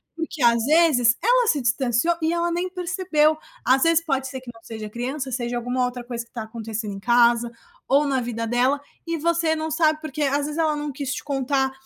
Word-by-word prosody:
Porque, 325 -4 -4
às 235 -1 +4
vezes, 285 -6 +4
ela - - +4
se 300 - +3
distanciou 245 +6 +1
e 320 +1 +1
ela 345 0 0
nem 350 +2 -1
percebeu. 355 -4 +1 0.3
Às 260 +2 +4
vezes, 330 0 +3
pode 270 -3 -1
ser 260 0 -6
que 245 - -9
não 230 - -17
seja 220 -2 -7
criança, 260 +4 -4
seja 240 -1 -2
alguma 245 +1 -1
outra 245 0 -5
coisa 240 -1 -5
que - - -29
está 230 -3 -5
acontecendo 220 -2 -5
em 195 - -7
casa 235 +1 +3 0.4
ou 285 +2 +3
na 270 -2 0
vida 230 -1 -3
dela. 255 +4 +2 0.3
E 335 0 -1
você 335 0 +1
não 315 0 -3
sabe 310 -1 +2
porque, 310 -1 -5
às 285 +1 +1
vezes, 300 - -5
ela 310 -2 +2
não 295 -1 -4
quis 280 0 -4
te - - -6
contar, 270 -1 0
270 Hz, 220 wpm, -23 LUFS, 240-315 Hz, 0.4 s, às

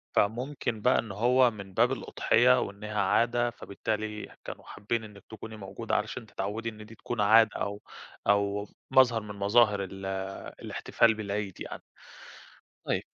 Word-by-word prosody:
فممكن 120 +1 0
بقى 125 +4 +4
إن 110 -3 -4
هو 125 +4 +4
من 100 -3 -10
باب 120 +5 +3
الأُضحية 125 -1 +3
وإنها 105 +1 -3
عادة، 120 +4 +2
فبالتالي 105 -1 -4
كانوا - - -7
حابّين 110 +2 -3
إنِك 105 -2 -12
تكوني 110 0 -9
موجودة 105 +3 -4
علشان 110 +3 -2
تتعوّدي 105 +2 -4
إن 110 -1 -11
دي 115 - -13
تكون 120 0 -3
عادة 110 +1 +6
أو 100 0 -3 0.5
أو 100 0 +2 0.2
مظهر 125 -4 +5
من 105 -1 -8
مظاهر 105 0 +4
ال 95 0 -8 0.6
الاحتفال 115 -1 +2
بالعيد 100 -3 -4
يعني. - - -7 1.0
طيب. - - 0
110 Hz, 140 wpm, -29 LUFS, 100-115 Hz, 1.0 s, عادة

